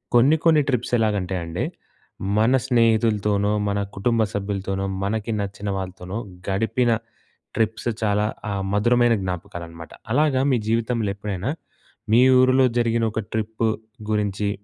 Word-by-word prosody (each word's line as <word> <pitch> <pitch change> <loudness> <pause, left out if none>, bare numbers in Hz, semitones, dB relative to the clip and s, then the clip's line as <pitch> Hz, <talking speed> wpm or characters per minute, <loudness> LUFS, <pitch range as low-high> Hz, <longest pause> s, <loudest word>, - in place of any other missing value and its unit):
కొన్ని 130 +6 +6
కొన్ని 160 -2 +6
ట్రిప్స్ 125 -2 -1
ఎలాగంటే 100 -5 0
అండి, 85 -1 -3 0.7
మన 110 +4 +4
స్నేహితులతోనో, 110 -4 +2 0.2
మన 100 0 0 0.2
కుటుంబ 115 +3 +1
సభ్యులతోనో, 100 -1 -2 0.2
మనకి 110 +3 -2
నచ్చిన 100 +1 -5
వాళ్ళతోనో 95 +1 -5 0.3
గడిపిన 115 +5 +1 0.7
ట్రిప్స్ 110 +1 0
చాలా 105 -1 +2 0.3
ఆహ్, 100 -1 -2
మధురమైన 120 +3 +4
జ్ఞాపకాలనమాట. 85 -3 -6 0.2
అలాగా 145 0 +3
మీ - - +4
జీవితంలో 115 -2 0
ఎప్పుడైనా 100 +2 -3 0.6
మీ 115 - +7 0.2
ఊరిలో 130 0 +5
జరిగిన 115 -1 +1
ఒక 110 - -1
ట్రిప్ 110 +1 -1 0.4
గురించి 105 -1 0
105 Hz, 120 wpm, -23 LUFS, 100-115 Hz, 0.7 s, మీ